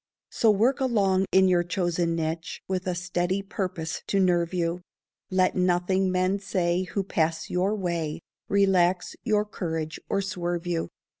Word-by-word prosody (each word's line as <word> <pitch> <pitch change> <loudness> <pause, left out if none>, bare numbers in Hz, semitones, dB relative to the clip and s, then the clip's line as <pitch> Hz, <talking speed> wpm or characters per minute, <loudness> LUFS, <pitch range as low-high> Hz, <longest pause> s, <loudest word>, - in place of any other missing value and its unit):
So 225 - +3
work 225 +7 +3
along 195 -7 +2
in 190 0 +5
your 180 -1 +4
chosen 175 -1 0
niche 165 0 -3
With 185 0 -2
a 180 - 0
steady 180 +2 -1
purpose 180 -5 -4
to 200 - +1
nerve 175 -3 +2
you; 175 -1 -1 0.5
Let 185 -1 +2
nothing 185 +1 +2
men 185 +2 +1
say 185 -2 0
who 195 +2 -2
pass 165 -3 -1
your 190 +4 +1
way 170 -5 -2 0.3
Relax 185 -3 +2
your 210 -3 +2
courage 160 -6 -4
or 200 - +1
swerve 175 -2 -3
you. 170 -2 -1
180 Hz, 150 wpm, -26 LUFS, 170-195 Hz, 0.5 s, in